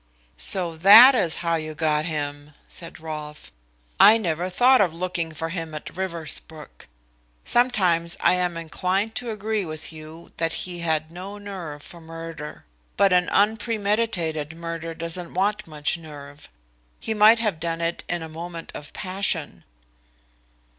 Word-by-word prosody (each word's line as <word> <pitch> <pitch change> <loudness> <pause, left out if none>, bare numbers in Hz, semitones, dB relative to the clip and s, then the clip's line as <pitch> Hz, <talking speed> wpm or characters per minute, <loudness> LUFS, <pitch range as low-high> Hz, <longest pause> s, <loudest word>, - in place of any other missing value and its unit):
"So 165 - +1
that 220 +10 +10
is 180 -10 +2
how 170 0 +2
you 155 -1 -6
got 155 -1 0
him!" 145 -2 -5
said 170 -2 -6
Rolfe. 150 -1 -8 0.5
"I 220 - +8
never 175 -3 -2
thought 250 +6 +5
of 175 -5 +1
looking 170 -2 -3
for 160 +1 -4
him 165 -2 -5
at 150 - -8
Riversbrook. 165 -4 -4 0.6
Sometimes 185 -9 +2
I - - +4
am 180 -2 0
inclined 185 +6 -1
to 245 -1 -4
agree 215 -1 -2
with 155 -1 -6
you 155 +2 -12
that 165 -1 0
he 180 -1 -6
had 160 -1 -1
no 190 +4 -8
nerve 180 -8 -8
for 170 - -12
murder. 165 -2 -9 0.3
But 195 -2 +4
an 180 0 +3
unpremeditated 205 -7 0
murder 165 0 -6
doesn't 170 +1 -3
want 205 +2 0
much 155 +2 -1
nerve. 145 -2 -12 0.5
He 220 - -3
might 215 +2 +6
have 215 -8 -1
done 165 0 -3
it 170 0 -2
in 175 -2 -2
a - - -6
moment 165 +1 -8
of 145 - -8
passion." 185 - -2
170 Hz, 145 wpm, -24 LUFS, 160-195 Hz, 0.6 s, that